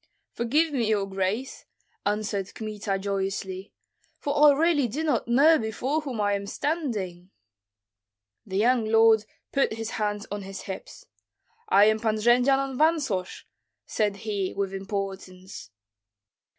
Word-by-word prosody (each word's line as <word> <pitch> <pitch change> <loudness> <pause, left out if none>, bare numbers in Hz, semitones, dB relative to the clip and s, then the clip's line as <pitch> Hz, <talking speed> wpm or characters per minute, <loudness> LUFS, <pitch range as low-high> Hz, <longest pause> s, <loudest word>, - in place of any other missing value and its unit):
"Forgive 295 +7 +1
me, 235 -5 0
your 205 -2 +1
grace," 195 +7 -3 0.4
answered 205 -2 -2
Kmita, 210 -3 -3
joyously, 195 -1 -3 0.5
"for 290 0 +4
really 320 -3 +3
I - - 0
do 280 +8 -3
not 305 -6 0
know 290 +7 +5
before 250 +7 -2
whom 265 -7 -5
I 205 -1 +2
am 200 0 -3
standing." 210 - -3 1.1
The 190 -2 -4
young 235 +2 +3
lord 225 0 +5 0.3
put 275 -4 +1
his 225 0 -5
hands 210 -1 -2
on 205 0 -3
his 195 0 -7
hips: 190 -1 -8 0.6
"I 205 - +6
am 215 0 +3
Pan 220 -1 0
Jendzian 250 +5 +3
of 260 - -6
Vansosh," 290 - 0 0.4
said 210 -2 0
he, 200 -3 -2
with 195 -1 -2
importance. 190 - -6
215 Hz, 135 wpm, -26 LUFS, 195-265 Hz, 1.1 s, I